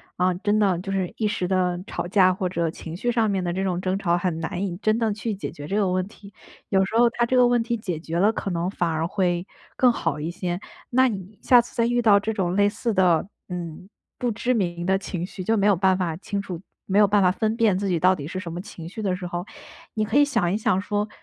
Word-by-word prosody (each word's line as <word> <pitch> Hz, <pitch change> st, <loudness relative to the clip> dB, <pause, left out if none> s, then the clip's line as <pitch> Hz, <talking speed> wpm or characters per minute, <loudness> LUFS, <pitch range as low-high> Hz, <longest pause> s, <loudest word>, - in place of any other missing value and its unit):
啊， 180 Hz, +1 st, +2 dB
真 205 Hz, +3 st, +1 dB
的 195 Hz, -5 st, +2 dB
就 190 Hz, +2 st, -7 dB
是 190 Hz, -2 st, -1 dB
一 215 Hz, -, +1 dB
时 185 Hz, -4 st, -2 dB
的 180 Hz, -2 st, +1 dB
吵 175 Hz, -, -4 dB
架 185 Hz, 0 st, +4 dB
或 185 Hz, 0 st, -2 dB
者 170 Hz, -2 st, -1 dB
情 160 Hz, 0 st, -8 dB
绪 240 Hz, +7 st, -1 dB
上 230 Hz, -2 st, +2 dB
面 195 Hz, -2 st, 0 dB
的 175 Hz, -, -1 dB
这 185 Hz, +2 st, -2 dB
种 185 Hz, -2 st, -1 dB
争 185 Hz, +1 st, -1 dB
吵， 175 Hz, -3 st, +1 dB
很 175 Hz, -2 st, -1 dB
难 180 Hz, +4 st, -3 dB
以 175 Hz, -3 st, -4 dB
真 215 Hz, +2 st, +1 dB
正 225 Hz, -2 st, +1 dB
去 215 Hz, +1 st, -3 dB
解 195 Hz, -, -5 dB
决 145 Hz, 0 st, -9 dB
这 195 Hz, -, -2 dB
个 205 Hz, -3 st, +2 dB
问 185 Hz, 0 st, 0 dB
题。 200 Hz, -1 st, -15 dB, 0.4 s
有 190 Hz, -1 st, +3 dB
时 205 Hz, -, -6 dB
候 240 Hz, 0 st, +6 dB
它 235 Hz, 0 st, 0 dB
这 255 Hz, -, 0 dB
个 250 Hz, -1 st, +6 dB
问 245 Hz, -1 st, +3 dB
题 235 Hz, +1 st, -1 dB
解 185 Hz, -8 st, -4 dB
决 165 Hz, +1 st, -4 dB
了， 205 Hz, +4 st, +4 dB
可 210 Hz, -, -4 dB
能 170 Hz, +1 st, -1 dB
反 175 Hz, -4 st, -1 dB
而 160 Hz, 0 st, -1 dB
会 175 Hz, -1 st, 0 dB, 0.3 s
更 250 Hz, -1 st, +5 dB
好 165 Hz, -10 st, -2 dB
一 155 Hz, +3 st, -3 dB
些。 175 Hz, +1 st, -3 dB, 0.3 s
那 260 Hz, +1 st, +4 dB
你 200 Hz, -1 st, -7 dB
下 245 Hz, -, +6 dB
次 240 Hz, -, -14 dB
再 230 Hz, -, +2 dB
遇 240 Hz, +1 st, +1 dB
到 210 Hz, -3 st, +6 dB
这 205 Hz, +2 st, -1 dB
种 185 Hz, -4 st, -1 dB
类 205 Hz, 0 st, +4 dB
似 230 Hz, +2 st, -2 dB
的， 180 Hz, -4 st, +3 dB, 0.2 s
嗯， 175 Hz, +1 st, -6 dB, 0.3 s
不 245 Hz, -1 st, -1 dB
知 245 Hz, +3 st, 0 dB
名 175 Hz, -6 st, -1 dB
的 190 Hz, +1 st, +3 dB
情 185 Hz, -3 st, -4 dB
绪， 185 Hz, 0 st, -7 dB
就 225 Hz, +4 st, +1 dB
没 200 Hz, 0 st, +3 dB
有 205 Hz, -, +5 dB
办 190 Hz, +1 st, +3 dB
法 175 Hz, -4 st, -1 dB
清 200 Hz, +3 st, -4 dB
楚 180 Hz, -4 st, -7 dB, 0.2 s
没 195 Hz, -, 0 dB
有 210 Hz, -, +7 dB
办 205 Hz, 0 st, +3 dB
法 180 Hz, -1 st, +4 dB
分 220 Hz, +2 st, -1 dB
辨 220 Hz, -5 st, +3 dB
自 200 Hz, 0 st, -1 dB
己 175 Hz, -3 st, +1 dB
到 185 Hz, +3 st, +4 dB
底 145 Hz, -5 st, -7 dB
是 185 Hz, +3 st, -4 dB
什 170 Hz, -3 st, -6 dB
么 175 Hz, -, -4 dB
情 170 Hz, -4 st, -10 dB
绪 200 Hz, +5 st, -7 dB
的 195 Hz, -3 st, 0 dB
时 180 Hz, -1 st, -4 dB
候， 175 Hz, 0 st, -4 dB, 0.5 s
你 215 Hz, -1 st, 0 dB
可 220 Hz, +5 st, 0 dB
以 290 Hz, -, +7 dB
想 225 Hz, -11 st, +1 dB
一 -, -, +1 dB
想 190 Hz, -3 st, +1 dB
说， 205 Hz, +1 st, -2 dB
190 Hz, 295 characters per minute, -24 LUFS, 175-215 Hz, 0.5 s, 有